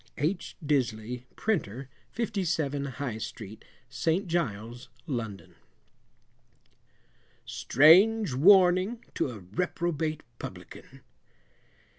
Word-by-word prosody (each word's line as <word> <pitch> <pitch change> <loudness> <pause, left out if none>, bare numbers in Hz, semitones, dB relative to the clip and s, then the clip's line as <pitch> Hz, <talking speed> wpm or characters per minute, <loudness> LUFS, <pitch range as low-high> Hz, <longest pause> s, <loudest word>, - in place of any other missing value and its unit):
H. 165 +5 -2
Disley, 125 -4 -1
Printer, 135 - -2 0.2
57, 170 - -2
High 125 -4 -4
Street, 110 -2 -8 0.2
St. 165 - -1
Giles, 120 - -3 0.2
London. 115 -7 -5 1.9
STRANGE 165 - +5
WARNING 185 - +4
TO - - -1
A 115 -4 -8
REPROBATE 155 - -2 0.2
PUBLICAN. - - -10
145 Hz, 75 wpm, -28 LUFS, 120-180 Hz, 1.9 s, STRANGE